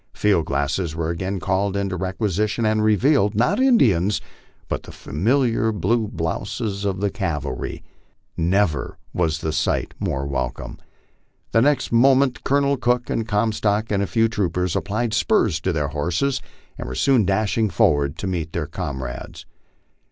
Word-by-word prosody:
Field 95 -7 +2
glasses 70 +4 -1
were 80 0 -1
again 95 +3 -3
called 95 +2 0
into 100 -2 -1
requisition, 105 +4 -1
and 110 0 +2
revealed, 110 0 +3
not 155 - +2
Indians, 105 - +3 0.5
but - - -2
the - - -11
familiar 115 - +1
blue 110 +3 0
blouses 100 +4 -3
of 95 -1 -1
the 100 -1 +1
cavalry. 75 - -4 0.5
Never 85 -3 0 0.2
was 85 -2 0
the 80 - -1
sight 75 - -1
more 70 0 -2
welcome. 65 -3 -4 0.7
The 115 - +4
next 140 0 +2
moment 130 +2 +4
Colonel 140 0 +2
Cook, 125 -1 0
with 115 -1 -1
Comstock 105 0 0
and 100 -1 +1
a 100 - 0
few 115 +2 +2
troopers, 90 -5 -1
applied 110 +2 -1
spurs 115 - +2
to 95 - 0
their 75 -3 -1
horses 90 - -1 0.4
and - - -5
were 65 - -5
soon 130 - +3
dashing 105 +2 +1
forward 75 -4 +2
to - - -5
meet 85 -4 -3
their 85 -3 -1
comrades. 65 -8 -6
100 Hz, 150 wpm, -22 LUFS, 85-115 Hz, 0.7 s, The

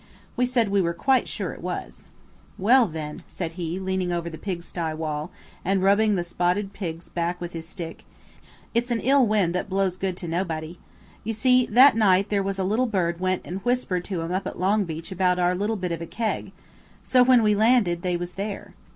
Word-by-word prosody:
We 250 0 +2
said 240 -4 +1
we 200 0 +2
were 170 -1 -1
quite 265 +6 +2
sure - - -3
it - - -12
was. - - -6 0.5
"Well, 235 +5 +5
then," 155 -3 -6
said 170 -3 -5
he, 170 0 -4
leaning 190 -1 -1
over 170 -1 -2
the 160 - -8
pigsty 170 -4 -4
wall, 155 0 -3 0.3
and 195 0 +1
rubbing 205 +2 +4
the 175 - 0
spotted 180 +3 -1
pig's 170 -4 -6
back 175 +1 -2
with 175 0 -6
his 165 -1 -7
stick. 170 -3 -7 0.7
"It's 235 +2 0
an 235 -1 0
ill 270 -1 +4
wind 205 -5 +2
that 180 - -2
blows 190 -1 0
no - - -25
good 190 -2 -1
to 175 - -5
nobody. 165 -1 -3 0.4
You 225 - -2
see, 250 +3 +3
that 255 +5 +7
night 200 -3 +3
there 205 -1 +1
was 195 0 -2
a 190 - -1
little 220 +7 +1
bird 175 -6 -1
went 185 0 0
and 185 +2 -5
whispered 245 -7 0
to 180 -5 -3
'em 165 - -4
up 190 +2 -1
at - - -6
Longbeach 185 -3 -1
about 180 -1 +2
our 180 0 +2
little 205 +4 -1
bit 180 -2 -3
of 165 -1 -3
a 165 - -5
keg. 225 +3 -3 0.5
So 255 - +4
when 250 -2 +6
we 210 -1 +4
landed 210 -5 +3
they 180 -1 0
was 175 0 -5
there." 200 0 -5
185 Hz, 210 wpm, -25 LUFS, 175-215 Hz, 0.7 s, that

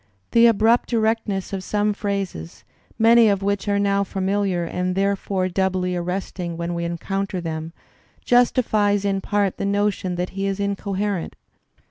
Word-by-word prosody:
The 235 0 +6
abrupt 230 +2 +3
erectness 220 -4 0
of 190 -1 -3
some 210 +1 0
phrases, 200 - -4 0.3
many 230 0 +6
of 200 -1 +1
wivch 200 +1 -1
are 200 0 +2
now 200 0 +2
familiar 195 -1 -1
and 180 +2 -2
therefore 195 -1 0
doubly 185 -1 0
arresting 180 -1 -4
when 170 +1 -3
we 170 0 -2
encounter 195 +3 -3
them, 160 -1 -5 0.5
justifies 215 -5 +2
in 195 -1 0
part 200 -1 0
the - - -2
notion 200 -2 0
that 180 +1 -3
he 195 +1 -2
is 195 0 -2
incoherent. 200 -2 -2
195 Hz, 145 wpm, -22 LUFS, 185-205 Hz, 0.5 s, The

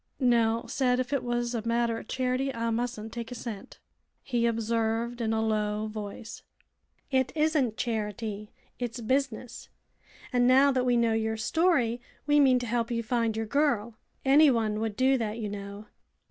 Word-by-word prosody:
"Nell 230 -3 +2
said 250 -2 +1
if 255 +2 -2
it 275 - +1
was 240 0 -2
a 230 - -1
matter 230 -1 +1
o' - - -8
charity 260 +1 -1
I 230 -2 -2
mustn't 230 -1 -3
take 235 -1 -5
a - - -5
cent," 225 -4 -7 0.5
he 240 -3 +1
observed, 230 +1 -1
in 225 -1 0
a 220 0 +1
low 210 -1 0
voice. 215 +1 -7 0.7
'"It 260 -1 +2
isn't 300 -7 +1
charity. 215 -2 -3 0.3
It's 240 -1 -4
business. 250 0 -2 0.6
And 245 0 +3
now 270 +2 +6
that 255 -1 0
we 245 -1 +3
know 230 -1 +2
your 220 0 -1
story 245 -3 +1 0.2
we 295 0 +4
mean 265 -3 +5
to 245 - -3
help 235 0 -1
you 230 -1 -1
find 230 -1 0
your 225 - -1
girl. 235 -3 +1 0.3
Anyone 255 -7 +4
would 220 -2 -2
do 260 +2 +3
that, 220 -1 -2
you 215 -3 -3
know. 200 +1 -7
235 Hz, 170 wpm, -28 LUFS, 220-255 Hz, 0.7 s, now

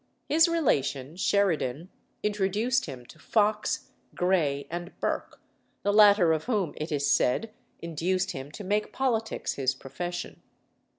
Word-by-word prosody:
His 325 +3 +5
relation, 145 - 0
Sheridan, 175 -6 +1 0.3
introduced 210 +5 +1
him 130 -4 -8
to 155 - -16
Fox, 210 +5 0 0.2
Grey, 160 -6 +1
and 175 +1 -6
Burke, - - -3 0.4
the 205 - +2
latter 205 -5 +7
of 155 - -2
whom, 205 -10 0
it 155 +2 -4
is 140 -1 0
said, 145 - +2 0.3
induced 175 +3 -1
him 135 +1 -7
to 210 - -7
make 205 +2 -1
politics 230 -4 -1
his 135 -1 0
profession. 175 +7 -6
180 Hz, 130 wpm, -28 LUFS, 145-210 Hz, 0.4 s, latter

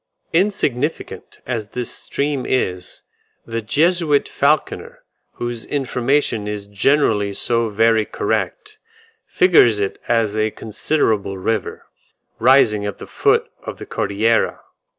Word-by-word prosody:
Insignificant 165 - -1
as 115 -4 -3
this 125 - -3
stream 140 -2 -2
is, 90 -8 -2 0.4
the 115 0 -3
Jesuit 155 +4 +2
Falconer, 150 +2 -1 0.3
whose 120 -1 -4
information 130 -4 0
is 105 -1 -4
generally 105 -1 +1
so 115 +2 +1
very 110 +1 +3
correct, 425 - -3 0.5
figures 125 - +4
it 100 -1 -3
as 115 -3 +1
a 110 0 +1
considerable 105 -3 -1
river, 105 +1 -3 0.5
rising 115 -4 +4
at 100 -1 -4
the - - -9
foot - - +1 0.2
of - - -7
the - - -9
Cordillera. 110 +3 0
115 Hz, 110 wpm, -19 LUFS, 105-145 Hz, 0.5 s, figures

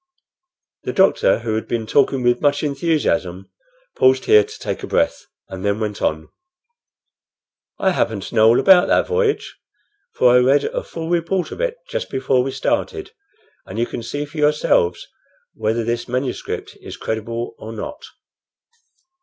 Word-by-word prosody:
The - - -4
doctor, 190 -10 +3
who 115 -2 -2
had 110 - -3
been 115 -2 -2
talking 135 +2 +2
with 120 0 +2
much 145 0 +2
enthusiasm, 140 - -1 0.4
paused 130 0 +3
here 105 -1 +6
to - - -11
take - - -4
breath, - - 0 0.2
and 95 0 -8
then 100 +1 0
went 105 -3 -4
on: 80 0 -1 1.5
"I 190 - +2
happen 110 - 0
to - - -9
know 110 -1 +5
all 115 - +5
about 190 -1 +6
that - - +3
voyage, 460 -2 -1 0.6
for 125 -1 +4
I 125 - +6
read 135 +3 +3
a - - -2
full 165 -1 -7
report 175 +2 0
of - - -6
it - - -1
just - - -4
before 130 -1 +1
we 130 - -2
started, 395 - -2 0.6
and - - -8
you 120 - +1
can 120 - -6
see 145 +6 -4
for 150 +2 -13
yourselves 150 -12 +2 0.5
whether 110 +2 -1
this 120 +1 -2
manuscript 125 +1 -4
is - - -9
credible 115 +2 -4
or 110 - -8
not. 115 - -7
125 Hz, 160 wpm, -20 LUFS, 110-160 Hz, 1.5 s, here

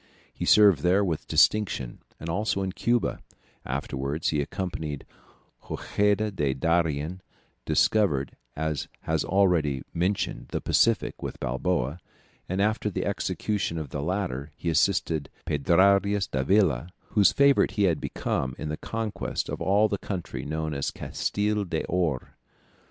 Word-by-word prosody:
He - - -4
served 100 -7 +6
there 95 +6 +3
with 80 -5 -3
distinction, 80 - +2 0.2
and 80 - -7
also 100 +3 0
in 95 - -2
Cuba; 120 +5 0 0.5
afterwards 70 +3 -2
he 75 -2 +1
accompanied 75 -3 -4 0.6
Hojeda 105 +1 0
to 75 -8 0
Darien, 80 +2 0 0.4
discovered, 75 - +2 0.2
as 80 -1 -2
has - - 0
been - - -5
already 85 -8 +2
mentioned, 90 +4 -1
the - - -3
Pacific, 115 -3 +1
with - - -5
Balboa, 65 +3 -1 0.5
and 95 +2 -1
after 110 0 0
the 100 - -3
execution 100 -5 -2
of 75 -3 -4
the 70 - -4
latter, 80 -5 -2
he 85 - -1
assisted 80 -3 +1 0.2
Pedrarias 100 +7 +3
Davila, 80 - +1 0.2
whose 100 -4 +5
favourite 140 0 +4
he 105 - +1
had 85 -5 +2
become, 65 0 -2
in 75 - -5
the 75 - -3
conquest 110 -2 -3
of - - -4
all 100 +3 +4
the 100 -2 -2
country 95 -4 -5
known 80 +1 -3
as 70 -1 -1
Castille 105 0 -1
d'Or. 85 -4 -2
90 Hz, 135 wpm, -27 LUFS, 75-100 Hz, 0.6 s, served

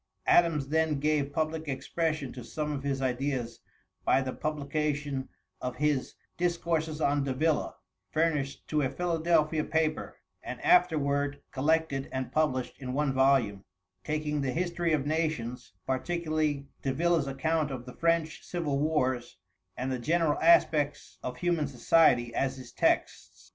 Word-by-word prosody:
Adams 155 -5 +3
then 160 -2 +1
gave 150 -1 +1
public 160 +1 -2
expression 155 0 -2
to 125 - -8
some 150 +5 -3
of 140 -2 -3
his 135 -1 -2
ideas 125 -2 -2 0.4
by - - +4
the 130 -1 -3
publication 145 -2 -2 0.3
of 125 0 -3
his 145 -1 0 0.2
'Discourses 170 -3 0
on 145 -2 +2
Davila,' 145 +4 0 0.3
furnished 150 -4 -1
to 150 -1 +1
a 135 - +1
Philadelphia 165 -2 +1
paper, 160 -1 -1 0.2
and - - -6
afterward 145 - +3
collected 145 -1 0
and 130 -1 -3
published 130 -5 0
in 130 -2 -5
one 145 0 +1
volume, 130 -7 +3 0.4
taking 150 -1 -1
the 130 -2 -1
history 175 -1 -1
of 150 -3 +1
nations, 150 - -2
particularly 155 0 -1 0.2
Davila's 160 +2 +1
account 155 +3 0
of 130 -3 -6
the 125 - -9
French 165 -2 0
civil 155 -6 -2
wars, 130 -5 0 0.4
and 130 +1 -2
the 130 - -2
general 160 +3 +1
aspects 155 -3 +3
of 125 0 -5
human 170 -1 0
society 125 -2 +3
as 135 +1 -1
his 125 -2 -10
texts. - - -1
150 Hz, 140 wpm, -29 LUFS, 135-160 Hz, 0.4 s, by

